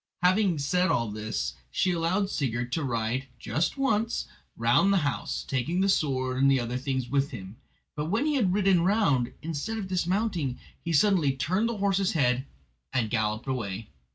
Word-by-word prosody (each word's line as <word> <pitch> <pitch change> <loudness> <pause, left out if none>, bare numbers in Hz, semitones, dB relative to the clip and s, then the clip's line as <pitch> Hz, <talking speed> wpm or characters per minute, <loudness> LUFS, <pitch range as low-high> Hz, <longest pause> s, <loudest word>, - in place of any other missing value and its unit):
Having 185 -1 +3
said 180 +6 +1
all 115 -3 +1
this 110 +1 -3 0.2
she 180 - +1
allowed 175 +4 +1
Sigurd 120 -3 -2
to 155 +4 -1
ride 120 +1 -1
"just 155 - -1
once" 230 -4 0 0.3
round 120 +12 +4
the 200 - +4
house, 145 - -2
taking 145 +7 -1
the 195 - +2
sword 130 -7 +1
and 135 -1 +5
other 120 0 -3
things 130 -2 -2
with 140 +2 +1
him. 100 -3 -9 0.4
But 150 - -2
when 220 - +1
he 305 - +1
had 225 -10 +2
ridden 190 -2 +3
round, 170 - +2
instead 165 +8 -3
of 200 -3 -4
dismounting, 180 - 0 0.3
he 170 - -2
suddenly 165 -3 +3
turned 185 - 0
the 235 - -3
horse's 195 -1 +1
head 130 -3 +1 0.4
and 115 -5 0
galloped 110 0 0
away. 110 -5 -3
145 Hz, 170 wpm, -27 LUFS, 125-190 Hz, 0.4 s, and